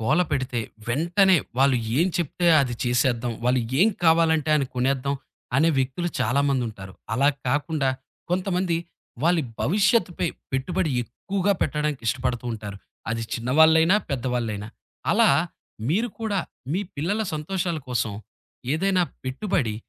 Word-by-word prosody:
గోలపెడితే 130 -2 +1 0.3
వెంటనే 175 +9 +4 0.2
వాళ్ళు 135 -1 +4 0.2
ఏం 170 - +4
చెప్తే 175 +1 -1
అది 125 -3 -1
చేసేద్దాం. 120 -1 +1
వాళ్ళు 125 +1 +3 0.2
ఏం 210 - +6 0.2
కావాలంటే 160 -2 +4
అని 140 -3 0
కొనేద్దాం 135 +2 0 0.4
అనే 155 +4 +4
వ్యక్తులు 135 +7 -1
చాలామందుంటారు. 125 -8 0 0.2
అలాగా 140 +3 +3
కాకుండా 145 +1 0 0.4
కొంతమంది. 180 -1 0 0.5
వాళ్ళి 170 0 +3 0.2
భవిష్యత్తుపై 195 0 +2 0.3
పెట్టుబడి 160 +6 0
ఎక్కువగా 195 - -1
పెట్టడానికి 150 -2 -1
ఇష్టపడుతూంటారు. 120 -4 -3 0.3
అది 115 0 -2
చిన్నవాళ్ళైనా 160 - +5
పెద్దవాళ్ళైనా. 120 -5 -2 0.4
అలా - - +5 0.6
మీరు 215 +10 +1
కూడా 210 -3 0 0.3
మీ 185 - +1 0.2
పిల్లల 195 +10 0
సంతోషాల 170 +2 -2
కోసం 115 -3 -1 0.6
ఏదైనా 185 +2 +2 0.2
పెట్టుబడి 130 - -1
145 Hz, 110 wpm, -24 LUFS, 125-175 Hz, 0.6 s, ఏం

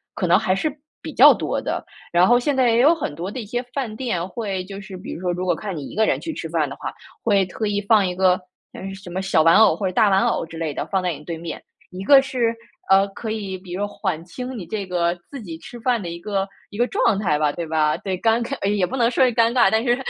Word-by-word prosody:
可 - - -1
能 175 +2 +5
还 185 -4 +1
是 295 +8 -2 0.3
比 - - -6
较 - - +9
多 - - -1
的。 - - -3 0.3
然 175 +1 +5
后 240 +1 +5
现 275 +2 -1
在 255 -2 +4
也 230 - +3
有 295 +7 +6
很 295 - -4
多 170 +5 -5
的 235 - -6
一 225 - -6
些 240 +4 -2
饭 250 -5 -3
店 215 -8 -2
会 195 -3 -4
就 195 +1 -8
是 190 -1 -9
比 180 - -7
如 - - -8
说， 180 -1 0
如 180 +1 -3
果 175 -2 +2
看 195 -1 -5
你 145 - -6
一 - - -10
个 220 +1 +3
人 - - +1
去 325 - -5
吃 165 - -6
饭 160 -2 0
的 135 - -7
话， - - -5 0.3
会 200 -4 +3
特 210 +4 -4
意 205 0 0
放 205 0 +4
一 180 -1 -2
个， 185 0 +4 0.4
呃， 195 +1 -7
什 190 -2 -11
么 185 +2 -2
小 190 -5 +2
玩 165 +1 +6
偶 220 0 +6
或 200 - -4
者 - - -2
大 210 +3 +4
玩 190 0 +3
偶 - - 0
之 165 0 -9
类 160 -2 -2
的， - - -3
放 190 -2 -1
在 180 -1 0
你 150 0 -10
对 165 +1 -5
面。 165 0 -7 0.3
一 185 +1 -7
个 275 +6 +7
是， 250 -4 0 0.4
呃， 195 +1 +5
可 215 +3 -6
以 200 -4 -4
比 185 -1 -13
如 180 - -4
说 205 - 0
缓 190 -5 -3
轻 250 +8 -6
你 190 - -6
这 200 +4 -4
个 175 -1 0
自 280 -3 -8
己 170 -6 -7
吃 240 +7 -10
饭 240 -1 +1
的 175 - -5
一 170 0 -6
个 195 +1 -1 0.2
一 205 - -10
个 240 - +3
状 395 - +2
态 175 -8 +1
吧， 150 -1 +1
对 170 - -4
吧？ 155 -1 +1
对， 190 -2 -4
尴 230 +2 +2
尬 245 -5 -2
也 205 -3 +2
不 260 +8 -4
能 235 -2 +3
说 245 - +2
是 255 - +4
尴 230 0 +3
尬， 220 -7 +5
但 220 - +3
是 240 -1 +3
195 Hz, 310 characters per minute, -22 LUFS, 175-230 Hz, 0.4 s, 较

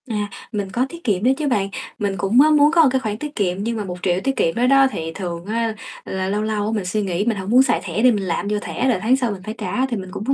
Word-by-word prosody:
À, 210 -2 -2 0.2
mình 205 -3 -3
có 245 +6 +1
tiết 340 +2 -11
kiệm 205 -4 0
đó 255 - +4
chứ 300 -1 -2
bạn. 205 -7 +1 0.3
Mình 200 -2 -1
cũng, 200 +8 +4
á, 305 - +5
muốn 295 0 +5
có 335 -1 +5
một 285 - +5
cái 265 - +2
khoản 215 -3 -3
tiết 295 +4 -7
kiệm, 185 -3 0
nhưng 230 +1 -2
mà 210 - -2
1.000.000 180 0 -1
tiết 270 0 0
kiệm 165 - +1
đó 245 +1 +2
đó 270 0 +6
thì 165 -5 -4
thường 175 -3 -5
á 225 +1 -1 0.3
là 190 0 -3
lâu 205 +2 0
lâu 215 -1 -1
á 215 - -1
mình 205 -4 -2
suy 210 +4 -1
nghĩ 190 0 -1
mình 230 -3 0
hông 190 0 -5
muốn 250 +4 +6
xài - - +1
thẻ 190 +2 -2
đi, 255 - +7
mình 205 -3 -1
làm 185 +2 -2
vô 210 0 0
thẻ 260 - -2
rồi 225 -7 +1
tháng 240 +4 +3
sau 250 -4 -1
mình 195 -2 -6
phải 215 +2 -5
trả, 255 - -1
thì 245 -4 -3
mình 190 -1 -7
cũng 200 - -6
có 275 - +2
215 Hz, 320 wpm, -21 LUFS, 195-250 Hz, 0.3 s, đi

